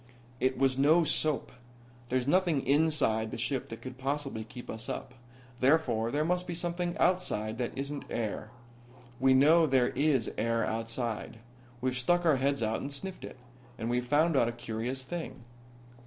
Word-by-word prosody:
"It 130 +1 +1
was 135 -1 +2
no 155 +5 +5
soap. 155 0 0 0.6
There's 130 -1 +1
nothing 170 -2 +2
inside 140 -7 +2
the - - -5
ship 125 +3 -2
that 115 - -8
could 130 0 -8
possibly 135 -4 -2
keep 120 +3 -10
us 110 0 -6
up. 125 - -5 0.5
Therefore 130 -5 +2
there 150 +4 0
must 180 +1 0
be 175 - -3
something 175 0 -2
outside 115 - 0
that 125 +1 -3
isn't 140 +1 -4
air. 110 -1 -3 0.7
We 130 +1 +5
know 160 +5 +6
there 130 -3 +3
is 140 -4 +1
air 115 +1 +1
outside. 115 0 -3 0.4
We've 130 0 0
stuck 175 +8 +2
our 155 -4 +5
heads 140 -1 0
out 110 +1 -1
and 140 - -5
sniffed 185 +7 -6
it. - - -8 0.4
And 115 +1 -2
we've 125 0 +1
found 155 +4 +3
out 120 -3 +4
a - - -5
curious 120 +3 -4
thing. 160 -4 -6
135 Hz, 170 wpm, -30 LUFS, 120-155 Hz, 0.7 s, know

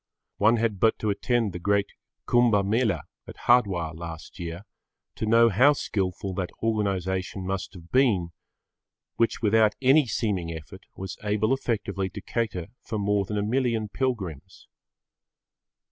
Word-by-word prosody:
One 110 +3 +4
had 110 -3 0
but 110 +2 +3
to 110 - 0
attend 115 0 0
the 90 - -5
great 100 +2 +1 0.4
Kumbha 115 -5 +4
Mela 105 - +1 0.2
at - - -10
Hardwar 95 -10 +3
last 80 -1 -9
year 85 +3 -6 0.5
to 110 - -4
know 115 +1 +6
how 125 +8 +5
skilful 95 -6 -2
that 90 -1 -3
organisation 95 -3 -1
must 95 0 -4
have 85 -1 -13
been, 105 -11 +3 0.9
which 115 0 +1
without 110 0 +4
any 135 +2 +5
seeming 95 -8 -1
effort 80 -3 -10
was 95 -1 -7
able 105 +3 +1
effectively 100 -7 -2
to 100 +2 -8
cater 100 -4 -3
for 110 - -4
more 100 -1 +1
than 105 +2 -3
a 100 - 0
million 115 -1 0
pilgrims. 100 - -4
105 Hz, 145 wpm, -26 LUFS, 95-115 Hz, 0.9 s, know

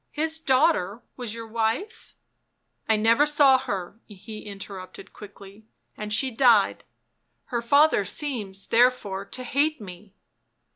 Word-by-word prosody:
" - - -51
His 320 0 0
daughter 260 - +1
was 240 -3 -5
your 230 0 -7
wife 225 - -3 0.2
?" - - -51
" - - -40
I 220 - +4
never 230 +7 +3
saw 285 -3 +5
her," 200 -4 -5
he 215 +1 -11
interrupted 195 -1 -10
quickly. 205 +1 -14
" - - -50
And 210 0 -7
she 260 +5 +1
died. 230 -4 +3 0.7
Her 235 - 0
father 285 -1 +4
seems, 200 -5 -3
therefore, 225 -5 +2
to 255 - -8
hate 290 +5 0
me." 195 0 -12
225 Hz, 145 wpm, -25 LUFS, 200-265 Hz, 0.7 s, saw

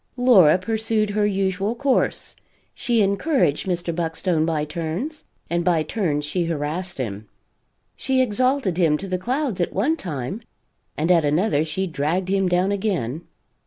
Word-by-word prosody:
Laura 200 -11 +6
pursued 220 +1 -1
her 205 0 +1
usual 195 +2 -1
course: 275 0 0 0.4
she 235 -3 +1
encouraged 200 - +1
Mr. 175 -2 -1
Buckstone 165 0 0
by 155 -2 0
turns, 170 - -4 0.2
and 170 0 -1
by 170 -3 +2
turns 155 -5 -1
she 170 +3 -1
harassed 165 +3 -3
him; 105 -5 -5 0.7
she 265 -1 0
exalted 255 -4 +1
him 160 -4 +3
to 195 - -7
the 185 -1 -2
clouds 250 -2 -1
at 175 - -1
one 255 - +1
time, 155 - -5 0.6
and 160 +4 +1
at 170 -3 +5
another 150 +2 +2
she 190 +4 -2
dragged 170 +3 -1
him 195 -1 +2
down 180 +2 +2
again. 175 - -2
185 Hz, 150 wpm, -22 LUFS, 160-215 Hz, 0.7 s, Laura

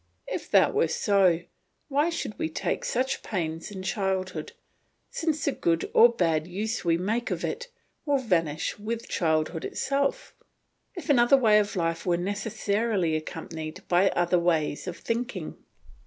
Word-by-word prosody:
If - - -5
that - - +5
were 435 +2 +3
so, 190 -5 +3 0.5
why 295 +3 +2
should 270 - -4
we 160 - -1
take - - -2
such 260 +2 -1
pains 165 -4 -3
in 190 -2 -7
childhood, 190 -5 -2 0.6
since 310 -3 -1
the 285 - +2
good 165 -9 0
or 235 - +8
bad 165 -8 0
use 215 +6 -3
we 165 -1 +2
make 220 +7 -1
of - - -3
it 485 - -4 0.4
will 290 -2 +2
vanish 170 - 0
with 225 +2 -4
childhood 160 0 0
itself; 275 0 -1 0.6
if 355 - -7
another 265 -2 +5
way 215 -5 +5
of 205 0 -1
life 165 -1 -1
were 175 -2 +1
necessarily 200 -1 -1
accompanied 160 +1 -6
by 180 +2 +4
other 175 0 +2
ways 165 -2 0
of 180 - -4
thinking? 240 +2 -3
195 Hz, 150 wpm, -27 LUFS, 165-235 Hz, 0.6 s, or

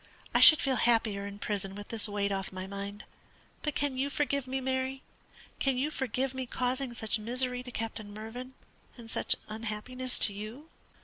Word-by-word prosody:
I - - +5
should 310 - +11
feel 265 -2 +1
happier 220 -4 +3
in 200 0 -7
prison 195 -2 -2
with 205 0 -8
this 225 -1 +4
weight 200 -1 0
off 195 -1 -2
my 185 0 -5
mind. 200 +1 -6 0.6
But 300 -2 -2
can 280 -2 0
you 275 +2 +1
forgive 280 -2 0
me, 265 +1 -1
Mary? 260 0 -1 0.6
Can 270 -2 +2
you 285 +4 0
forgive 265 -2 -1
me 260 -1 -4
causing 255 +1 -1
such 220 -1 +1
misery 250 +3 +1
to 250 - -9
Captain 225 -3 -4
Mervyn, 235 +5 -7 0.4
and 230 -2 -10
such - - +1
unhappiness 230 +4 -2
to 205 - +4
you?" 220 +10 -7
240 Hz, 180 wpm, -31 LUFS, 210-260 Hz, 0.6 s, should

